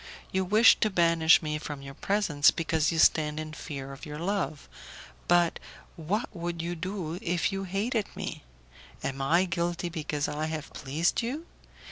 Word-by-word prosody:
You 190 0 +1
wish 215 +5 +6
to 215 - +2
banish 170 -3 +4
me 150 0 -2
from 145 -2 -7
your 135 0 -8
presence 165 -4 +3
because 160 -2 0
you 165 - -2
stand 155 -1 +4
in 155 0 -6
fear 140 -4 -7
of 135 - -12
your 150 -1 -6
love, 175 -3 -2 0.6
but 175 -1 +3 0.4
what 185 +8 -3
would 170 0 -4
you 170 +1 -2
do 180 -1 -4
if 175 +2 0
you 195 0 -3
hated 205 +4 -1
me? - - -5 0.6
Am 135 0 -3
I 170 +7 +3
guilty 175 -1 -2
because 150 -3 -2
I 155 +1 -2
have 155 -1 -5
pleased 150 - 0
you? 275 +8 -4
165 Hz, 165 wpm, -28 LUFS, 150-185 Hz, 0.6 s, wish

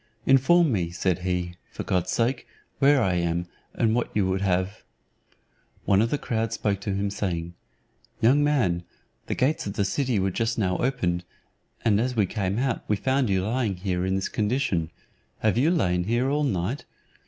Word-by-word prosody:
"Inform 145 +5 +5
me," 90 -6 0
said 90 +1 -1
he, 90 -1 -2
"for - - -5
God's 90 -1 0
sake, 120 +5 0 0.3
where 140 -2 +5
I 95 -3 +1
am, 85 0 0 0.3
and 110 -2 +2
what 120 +1 0
you 100 -3 +2
would 95 +1 0
have?" 95 +2 -1 1.0
One 100 0 +4
of 115 - +1
the 145 - 0
crowd 115 -4 -2
spoke 105 -3 -1
to 100 -1 -2
him 100 0 -1
saying, 85 -4 -3 0.7
"Young 135 +6 +4
man, 120 -13 +1 0.4
the - - -1
gates 135 -2 0
of 100 - -3
the 100 - 0
city 125 +2 0
were 95 0 +1
just 115 +3 -1
now 90 -4 +1
opened, 90 -10 0 0.6
and 105 -3 +4
as 125 +2 -1
we 105 -3 +3
came 95 +1 -2
out 130 -1 -1
we 105 - +2
found 130 +4 +1
you 95 -1 +1
lying 115 -3 0
here 90 -1 -2
in 95 +1 0
this 95 - -1
condition: 105 - 0 0.5
have 110 -2 +2
you 135 +7 +3
lain 90 - +1
here 120 +5 +1
all 150 +1 +1
night? 105 +3 -2
105 Hz, 185 wpm, -25 LUFS, 90-125 Hz, 1.0 s, Inform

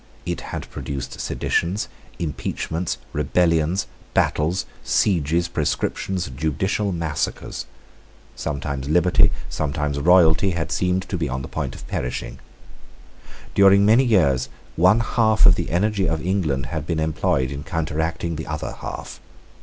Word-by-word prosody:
It - - -3
had - - -6
produced 65 -2 -5
seditions, 90 +5 -1 0.3
impeachments, 80 +1 -3 0.2
rebellions, 85 +4 +2 0.3
battles, 80 +4 +1 0.2
sieges, 85 -3 +2
proscriptions, 85 +3 -1
judicial 80 +8 0
massacres. 85 -4 -3 0.7
Sometimes 70 -2 -3
liberty, 90 +3 +4 0.2
sometimes 75 -1 -2
royalty, 90 +2 +5
had 80 - -2
seemed 90 0 0
to 95 - -1
be 80 -4 -1
on 65 +1 -3
the - - -6
point 70 -5 -4
of - - -10
perishing. 60 - -4 1.1
During 100 0 +6
many 115 +5 +6
years 75 - +3 0.3
one 95 +7 +5
half 110 -2 +3
of 95 - +9
the - - -3
energy 100 +2 +1
of 80 0 -2
England 80 -9 0
had 80 -1 -3
been 80 -2 0
employed 75 -4 0
in 70 +1 -5
counteracting 80 0 -2
the 80 - -5
other 75 0 -3
half. - - -7
80 Hz, 130 wpm, -22 LUFS, 75-95 Hz, 1.1 s, of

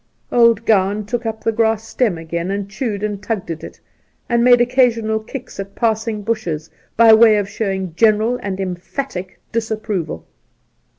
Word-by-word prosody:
'Old 230 -2 +4
Gowan 205 -1 +2
took 235 +1 -3
up 220 0 -5
the 225 - +2
grass 225 0 0
stem 220 -5 0
again, 170 +2 -4
and 200 0 -2
chewed 210 0 -4
and 205 -2 -3
tugged 210 -5 -3
at 165 - -6
it, - - -10 0.5
and 235 -1 +2
made 245 0 +6
occasional 240 -3 +2
kicks 250 +1 -9
at 195 0 -6
passing 220 -2 -1
bushes, 180 -9 -3 0.3
by 230 -1 +8
way 220 -1 +7
of 205 -1 -1
showing 195 -2 -2
a - - -3
general 220 +6 +2
and 195 -1 -4
emphatic 185 +1 -5
disapproval. 215 - -3
215 Hz, 165 wpm, -19 LUFS, 195-230 Hz, 0.5 s, by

